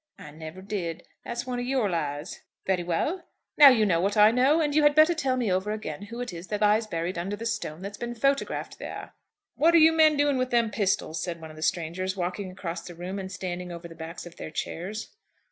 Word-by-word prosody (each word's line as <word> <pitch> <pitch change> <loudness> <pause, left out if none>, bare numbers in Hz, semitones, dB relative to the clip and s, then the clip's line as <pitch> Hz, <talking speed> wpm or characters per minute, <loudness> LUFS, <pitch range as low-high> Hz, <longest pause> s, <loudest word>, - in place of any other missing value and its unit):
"I 150 - -11
never 160 +4 -9
did. 175 -5 -4 0.2
That's 240 +2 -4
one 250 -1 -3
of 245 - -3
your 260 -5 +1
lies." 150 -3 -3 0.2
"Very 190 -2 +1
well. 180 - -2 0.3
Now 290 -2 +10
you 225 -5 +4
know 170 -4 +2
what 200 +3 0
I 210 +1 +7
know; 265 +6 +4
and 295 -2 +1
you 305 - +4
had 295 -1 +5
better 310 +3 +6
tell 270 -5 0
me 235 -6 0
over 190 +3 0
again 215 -1 -5
who 235 +3 -7
it 245 -6 -5
is 170 +2 -8
that 210 -1 -3
lies 215 +1 +3
buried 170 -1 -3
under 195 +4 -3
the 225 +2 -7
stone 190 -7 -3
that's 200 +1 -7
been 240 0 -4
photographed 275 +4 -1
there." - - -7 0.4
"What 335 +2 +5
are - - +9
you 320 0 +7
men 315 -2 +5
doing 285 -1 +2
with 255 0 0
them 235 -3 +2
pistols?" 195 -6 0
said 170 -2 -4
one 160 -1 -9
of - - -13
the 155 - -10
strangers, 180 +4 -1
walking 185 +2 -3
across 175 -2 -5
the 175 0 -10
room, 180 +3 -5
and 190 -1 -6
standing 180 -1 -5
over 170 0 -7
the 165 - -11
backs 165 +2 -8
of 175 0 -12
their - - -6
chairs. 190 - -5
200 Hz, 240 wpm, -27 LUFS, 175-245 Hz, 0.4 s, Now